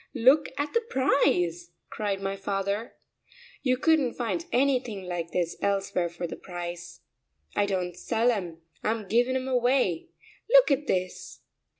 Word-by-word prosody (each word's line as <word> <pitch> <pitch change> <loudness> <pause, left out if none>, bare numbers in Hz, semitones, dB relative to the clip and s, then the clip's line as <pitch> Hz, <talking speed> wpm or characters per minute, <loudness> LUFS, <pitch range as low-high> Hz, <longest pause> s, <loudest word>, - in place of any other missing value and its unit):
Look 265 +5 +5
at 290 +1 -2
the 465 - +3
price!" 180 - +1 0.2
cried 200 -2 -2
my 195 0 -1
father. 200 +2 -2 0.7
"You 255 -2 +2
couldn't 295 -3 +2
find 260 +8 -2
anything 250 -6 +1
like 175 -2 -4
this 170 0 -1
elsewhere 195 -3 0
for 170 +1 -5
the 170 - -5
price! 175 -1 -7 0.5
I 205 - +2
don't 180 -3 -2
sell 230 +5 +1
'em; 175 -7 -4 0.2
I'm 215 -2 -1
giving 245 +5 +2
'em 260 0 -2
away. 245 -8 +1 0.4
Look - - +7
at 280 +1 +1
this!" 185 0 -3
205 Hz, 140 wpm, -27 LUFS, 180-260 Hz, 0.7 s, Look